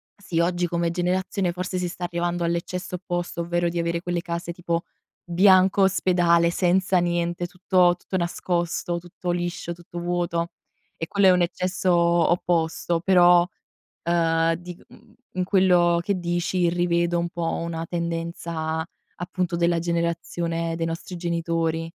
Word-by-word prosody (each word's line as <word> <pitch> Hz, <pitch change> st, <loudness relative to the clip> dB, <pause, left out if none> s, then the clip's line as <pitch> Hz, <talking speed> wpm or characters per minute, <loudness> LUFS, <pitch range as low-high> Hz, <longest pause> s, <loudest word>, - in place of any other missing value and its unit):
sì, 180 Hz, -5 st, -3 dB
oggi 175 Hz, +1 st, +1 dB
come 170 Hz, 0 st, -1 dB
generazione 180 Hz, +1 st, -1 dB
forse 180 Hz, +1 st, -3 dB
si 180 Hz, -, -1 dB
sta 175 Hz, -, -8 dB
arrivando 175 Hz, 0 st, -1 dB
all'eccesso 170 Hz, +2 st, -2 dB
opposto, 175 Hz, -1 st, -3 dB
ovvero 175 Hz, 0 st, 0 dB
di 170 Hz, 0 st, -3 dB
avere 170 Hz, 0 st, -1 dB
quelle 175 Hz, -1 st, -2 dB
case, 170 Hz, 0 st, -4 dB
tipo 170 Hz, -1 st, -2 dB, 0.4 s
bianco 190 Hz, +2 st, +5 dB
ospedale 175 Hz, -3 st, +3 dB
senza 185 Hz, +1 st, +2 dB
niente, 175 Hz, 0 st, -1 dB
tutto 180 Hz, -1 st, +3 dB
tutto 185 Hz, -, -4 dB
nascosto, 175 Hz, 0 st, -1 dB
tutto 175 Hz, +1 st, -5 dB
liscio, 175 Hz, 0 st, -3 dB
tutto 175 Hz, 0 st, -12 dB
vuoto 175 Hz, -1 st, -1 dB, 0.5 s
e 165 Hz, -, -4 dB
quello 200 Hz, -1 st, +2 dB
è 185 Hz, -, +8 dB
un 180 Hz, -1 st, +3 dB
eccesso 185 Hz, +1 st, 0 dB
opposto. 170 Hz, 0 st, +2 dB
Però, 175 Hz, -2 st, +6 dB, 0.6 s
ehm, 165 Hz, -1 st, +2 dB
di 175 Hz, +1 st, -9 dB
mhmm, 225 Hz, -1 st, -19 dB, 0.2 s
in 185 Hz, 0 st, -1 dB
quello 180 Hz, -3 st, +4 dB
che 195 Hz, 0 st, -1 dB
dici 175 Hz, 0 st, 0 dB
rivedo 170 Hz, 0 st, +1 dB
un 170 Hz, 0 st, -2 dB
po' 170 Hz, -1 st, -2 dB
una 165 Hz, 0 st, -4 dB
tendenza, 165 Hz, -1 st, -3 dB, 0.3 s
appunto, 175 Hz, 0 st, -2 dB
della 170 Hz, 0 st, +2 dB
generazione 170 Hz, 0 st, -2 dB
dei 165 Hz, -, -1 dB
nostri 165 Hz, +2 st, -5 dB
genitori. 165 Hz, -1 st, -1 dB
175 Hz, 140 wpm, -24 LUFS, 170-180 Hz, 0.6 s, è